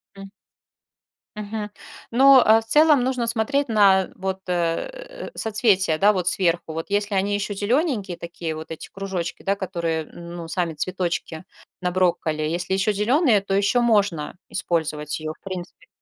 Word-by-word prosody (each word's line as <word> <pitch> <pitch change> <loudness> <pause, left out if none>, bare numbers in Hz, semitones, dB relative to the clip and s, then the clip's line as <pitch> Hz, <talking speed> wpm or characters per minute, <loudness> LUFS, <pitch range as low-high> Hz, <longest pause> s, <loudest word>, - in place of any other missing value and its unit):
М. 195 0 -11 1.0
Мгм. 210 0 -5 0.4
Но, 265 +2 +7
э, 220 +1 +6
в - - -14
целом 295 +1 +5
нужно 250 -2 -1
смотреть 255 +5 +1
на 195 -4 +4
вот, 190 0 -3
э, - - -3
соцветия, 210 -7 +2
да 205 +5 +4
вот, 180 -2 +2
сверху. 175 -3 0
Вот 165 +1 -4
если 205 +1 0
они 200 +1 +1
ещё 205 0 -2
зелененькие 210 - 0
такие 170 -1 -5
вот 160 +1 -9
эти 160 - -8
кружочки, 190 -3 -5
да 200 0 0
которые, 170 -4 -2
м, 170 +1 -10
ну, 165 - -7
сами 170 -1 -2
цветочки 175 -1 -3 0.4
на 180 - -1
брокколи, 175 -4 0
если 175 +4 -2
ещё 195 +2 +1
зеленые, 230 - +3
то 195 0 -4
ещё 200 +5 +2
можно 200 -9 +1
использовать 150 -3 -2
её 155 0 -5
в - - -32
принципе. 185 -2 -8
195 Hz, 155 wpm, -23 LUFS, 170-220 Hz, 1.0 s, Но